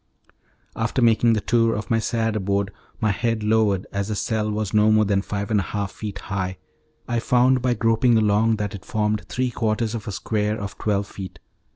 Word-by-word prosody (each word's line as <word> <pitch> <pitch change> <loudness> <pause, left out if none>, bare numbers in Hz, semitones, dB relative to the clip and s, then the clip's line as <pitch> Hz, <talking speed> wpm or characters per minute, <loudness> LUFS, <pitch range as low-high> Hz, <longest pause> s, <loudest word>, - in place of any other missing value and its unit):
After 115 +3 -1
making 115 -1 +4
the 110 - 0
tour 115 0 +2
of 105 +2 -5
my 115 - +3
sad 115 -1 -1
abode, 100 -1 0 0.3
my 110 -2 +2
head 115 +1 -1
lowered, 105 -3 +2
as 100 0 -1
the 110 - -2
cell 110 0 -1
was 105 -2 -2
not 105 0 +5
more 110 0 +4
than 100 -1 +1
five 100 +1 -4
and 105 - +3
a - - 0
half 100 +2 -3
feet 105 -2 -6
high, 95 -1 -3 0.5
I 120 -1 0
found 125 +2 +3
by 125 -1 +1
groping 115 +2 +3
along 110 +1 +3
that 105 -2 -3
it 100 - -8
formed 105 -1 -1
three 125 -1 -1
quarters 110 0 -1
of 115 -3 -5
a - - -2
square 105 +2 -1
of 100 -1 -7
twelve 100 -1 0
feet. 95 -2 -9
110 Hz, 205 wpm, -23 LUFS, 100-115 Hz, 0.5 s, not